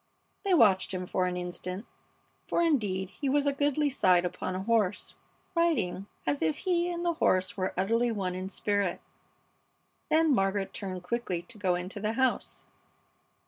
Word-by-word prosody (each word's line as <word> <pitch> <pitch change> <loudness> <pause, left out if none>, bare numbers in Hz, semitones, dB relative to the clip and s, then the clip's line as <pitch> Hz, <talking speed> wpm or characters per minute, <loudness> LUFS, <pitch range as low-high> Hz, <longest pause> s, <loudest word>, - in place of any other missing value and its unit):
They 390 -3 +3
watched 195 - +4
him 185 0 -3
for 180 0 0
an 180 0 -2
instant, 180 +3 -5 0.6
for, 340 - +2
indeed, 200 - +1
he 275 +7 -3
was 285 +1 +2
a 285 - +2
goodly 290 +1 +1
sight 180 -8 +4
upon 185 +1 -3
a 185 - -3
horse, 210 -3 +1 0.4
riding 230 - +1 0.2
as 145 -1 0
if 160 -1 +1
he 350 -1 +1
and 345 0 -3
the 340 - +2
horse 185 - +1
were 185 -1 -2
utterly 230 +5 +2
one 190 -4 -2
in 185 +1 -4
spirit; 200 -2 0 1.1
then 315 -1 +4
Margaret 195 -2 0
turned 185 -3 -5
quickly 180 -4 -2
to 220 +5 -12
go 185 -3 +2
into 180 +3 -4
the 215 +2 -1
house. 260 +1 0
200 Hz, 165 wpm, -29 LUFS, 185-275 Hz, 1.1 s, watched